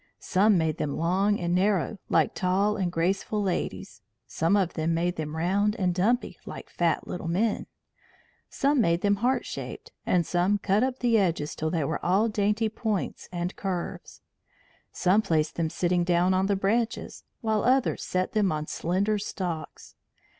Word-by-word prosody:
Some 200 +1 +3
made 160 -2 0
them 145 - -2
long 190 +5 +1
and 175 0 -1
narrow, 195 +1 +1
like - - +2
tall 195 +3 +1
and 185 -4 -1
graceful 195 +5 0
ladies; 195 +1 -3 0.2
some 165 +7 0
made 170 -2 0
them 155 -1 -4
round 200 +5 +1
and 185 -5 0
dumpy, 225 +8 0
like - - -8
fat 170 -2 0
little 175 - -5
men; 205 +6 0 0.8
some 280 -1 +2
made 170 -4 +2
them 205 0 +2
heart 250 +5 +1
shaped, - - -7
and 175 -2 +2
some 180 +5 +1
cut 200 +1 +1
up 260 0 0
the 235 -2 +4
edges 165 -6 0
till 160 - -2
they 165 -2 0
were 140 - -3
all 200 +6 +3
dainty 210 +1 +1
points 215 -2 -3
and 175 +1 -3
curves. 185 -3 -5 0.7
Some 190 +4 +3
placed 160 -6 0
them 165 -2 -1
sitting 175 +1 +1
down 175 +1 +2
on 190 +1 +2
the 200 - +2
branches, 220 +4 -1 0.2
while 220 -3 0
others 260 +1 +2
set 185 0 -1
them 210 -3 +2
on 155 -1 -2
slender 195 +7 0
stalks. 180 -5 -5
190 Hz, 160 wpm, -27 LUFS, 170-210 Hz, 0.8 s, the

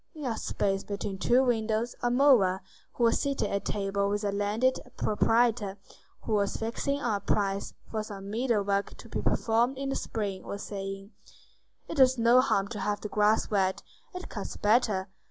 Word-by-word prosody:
In 300 -3 -6
a 235 -3 -1
space 195 -2 -1
between 200 -1 -4
two 250 +6 +4
windows 225 -1 0
a 245 - +1
mower, 240 -8 +4 0.3
who 240 - -2
was 230 - +4
seated 280 -1 -1
at 200 0 -2
table 200 -1 -1
with 205 +1 -1
a 205 - 0
landed 210 +6 +1 0.2
proprietor 220 -2 +2 0.4
who 220 - -3
was 200 -1 +1
fixing 235 +5 -2
on 235 -7 0
a - - -7
price 200 0 -1 0.2
for 220 - -1
some 200 -2 -8
meadow 230 -2 +1
work 200 0 -1
to - - -12
be - - -3
performed 235 +4 +1
in 275 0 -3
the 270 - -1
spring, 200 -4 -3
was 200 - -6
saying:— 195 0 -6 0.8
"It 330 - -6
does 260 -1 +5
no 235 +2 +6
harm 200 -7 +1
to 215 - -5
have 205 +1 -1
the 210 - -5
grass 210 +2 +2
wet. 190 -2 +1 0.3
It 365 - -6
cuts - - -6
better. 210 -3 +2
215 Hz, 185 wpm, -29 LUFS, 200-240 Hz, 0.8 s, no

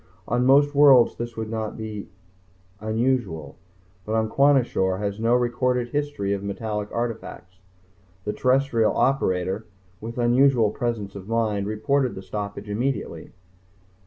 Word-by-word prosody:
On 125 +2 +1
most 145 +2 +5
worlds 140 -4 +6
this 120 -1 -6
would 110 0 -4
not 110 -1 -4
be 110 -2 -6 0.7
unusual, 110 - -1 0.5
but 110 +2 0
Kwashior 125 -10 +2
has 100 +1 -3
no 115 +2 +3
recorded 125 0 0
history 145 -8 -2
of 100 - -3
metallic 105 +1 -4
artifacts. 95 -6 -5 0.7
The 105 - -2
terrestrial 130 -4 +2
operator, 95 -6 0 0.3
with 115 +2 -7
unusual 120 -2 +3
presence 110 -4 -3
of 100 +1 -9
mind, 110 -3 0
reported 130 +5 0
the 95 - -8
stoppage 100 +1 -6
immediately. 120 +6 -3
115 Hz, 125 wpm, -24 LUFS, 100-125 Hz, 0.7 s, worlds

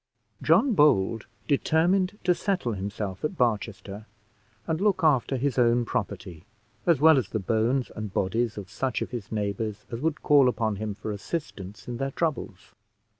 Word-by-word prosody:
John 270 -4 +4
Bold 115 - +3 0.2
determined 180 +7 +2
to 180 0 +4
settle 180 - -1
himself 100 -1 -5
at 160 +4 -2
Barchester, 110 -3 -2 0.6
and 160 +2 -2
look 200 -4 +2
after 135 -3 +3
his 130 0 0
own 120 0 +3
property, 100 -8 -4 0.4
as 165 -6 +4
well 155 -1 +6
as 105 -7 -4
the 110 - -2
bones 115 +6 0
and 110 -2 -5
bodies 110 +5 -1
of 100 -2 -8
such 130 +2 -1
of - - -8
his 120 -5 -6
neighbours 105 0 -3
as 115 +1 -5
would 160 -1 -1
call 140 -3 +5
upon 110 -4 -1
him 105 -1 -4
for 105 +1 -5
assistance 105 - -6
in 120 -1 -4
their 135 +2 -2
troubles. 135 - -3
120 Hz, 165 wpm, -26 LUFS, 105-150 Hz, 0.6 s, well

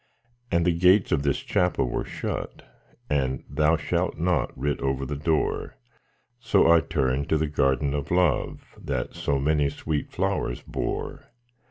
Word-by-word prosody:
And 85 -1 +2
the 90 - +3
gates 90 +3 +4
of 75 - +2
this 70 -1 +1
Chapel 90 -7 +1
were - - -2
shut, - - -5 0.4
And 65 -3 -1
'Thou 75 +4 +2
shalt 85 +3 -1
not' 90 +1 +1
writ 70 +2 -1
over 70 0 -1
the 75 - -4
door; 80 +2 -1 0.6
So 85 - +4
I 85 - +7
turned 70 -3 -1
to 80 - +3
the 80 - +1
Garden 70 -1 +1
of 70 -1 -3
Love 90 -1 +1 0.2
That - - -3
so 70 - -1
many 75 +1 +2
sweet 75 +1 -3
flowers - - -1
bore. - - -4
75 Hz, 155 wpm, -25 LUFS, 70-85 Hz, 0.6 s, I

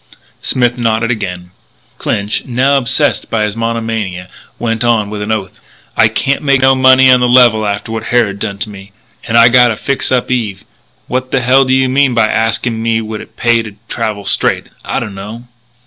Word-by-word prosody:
Smith 120 -1 0
nodded 115 0 0
again. 90 -6 -5 0.5
Clinch, 100 +1 -2
now 130 +3 +1
obsessed 135 +3 +1
by 115 -2 0
his 105 -1 -2
monomania, 115 -6 -3 0.3
went 115 -1 -2
on 110 -4 +1
with 105 -1 -5
an 105 +2 -3
oath: 105 -4 -4 0.4
"I 110 - +5
can't 135 +5 -1
make 140 -3 +2
no 135 0 +5
money 130 0 +5
on 125 - +5
the 125 - +2
level 120 -4 +4
after 100 +2 -3
what 115 0 -4
Harrod 110 -5 0
done 100 0 -4
to 105 - -4
me. 100 0 -13 0.3
And 115 0 +1
I 115 0 +7
gotta 120 -1 +4
fix 135 +5 -2
up 130 0 0
Eve. 105 -6 -2 0.4
What 130 +1 -3
the 135 - +1
hell 130 +2 +4
do 130 - +1
you 130 0 +2
mean 130 -1 +2
by 115 -2 +4
asking 115 +1 -1
me 115 0 0
would 110 -1 -6
it - - -15
pay 120 -1 +2
me - - 0
to 110 -2 -9
travel 110 -3 -4
straight - - 0
I - - -2
dunno." 105 +4 -7
115 Hz, 195 wpm, -13 LUFS, 105-125 Hz, 0.5 s, I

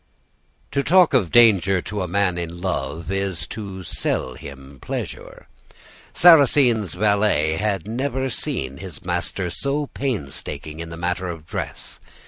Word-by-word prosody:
"To 140 - +1
talk 175 +2 +5
of 110 -10 +3
danger 100 -5 +5
to 105 -2 -4
a 90 - -2
man 90 0 +1
in 85 0 -5
love 85 -1 -3
is 95 -3 -2
to 95 -4 -7
sell 65 -5 -2
him 70 +1 -11
pleasure. - - -6 0.6
Sarrasine's 135 - +5
valet 100 -6 +2
had 100 -2 -1
never 130 +3 -2
seen 65 - -3
his 90 -4 -10
master 90 -3 -2
so 140 - -2
painstaking 80 - -4
in 85 0 -6
the 85 - -8
matter 90 +2 -2
of 85 -3 -7
dress. - - -6
95 Hz, 135 wpm, -22 LUFS, 85-115 Hz, 0.6 s, talk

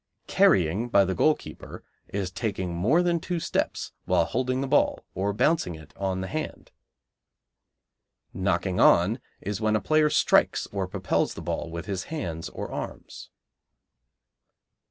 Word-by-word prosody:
Carrying 115 - +3
by 100 -4 +5
the 95 - -1
goalkeeper 155 - -1 0.2
is 95 -2 -3
taking 95 -2 -3
more 120 - +3
than 170 -1 +1
two 175 +1 -3
steps - - -2
while 90 -2 +3
holding 130 +4 -1
the 135 - -2
ball 145 - +2
or 100 +2 -1
bouncing 105 - +1
it 80 0 -14
on 95 -1 -2
the 95 - -4
hand. 155 +5 -5 1.6
Knocking 95 -1 0
on 95 +8 +5 0.2
is 105 +1 -4
when 110 0 +2
a - - +3
player 155 +6 +3
strikes - - +3
or - - -1
propels - - -1
the - - -7
ball - - -3
with 85 +1 -6
his 95 -3 -3
hands 85 - -4
or - - -6
arms. - - -7
100 Hz, 145 wpm, -26 LUFS, 90-140 Hz, 1.6 s, by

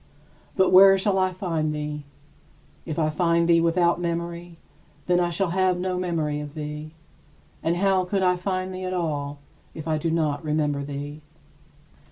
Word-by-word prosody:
But 190 -2 +3
where 195 +1 +8
shall 195 0 +1
I 185 0 +2
find 165 -5 -2
thee? 150 -1 -5 0.8
If 155 - -4
I 155 -2 +1
find 170 +1 +2
thee 170 -1 +5
without 170 +1 +2
memory, 170 0 -4 0.5
then 180 0 +2
I 175 -1 +1
shall 175 +1 -1
have 185 0 +2
no 185 0 -2
memory 160 -5 -1
of 150 0 -8
thee; 150 +1 -6 0.7
and 165 +1 0
how 190 0 +2
could 190 +1 -1
I 180 0 +3
find 185 +1 -3
thee 185 0 -6
at 185 - -3
all, 145 -4 -2 0.4
if 160 0 -7
I 155 -1 0
do 165 - -1
not 155 -3 0
remember 150 -2 0
thee? 145 +1 -6
170 Hz, 170 wpm, -24 LUFS, 150-185 Hz, 0.8 s, where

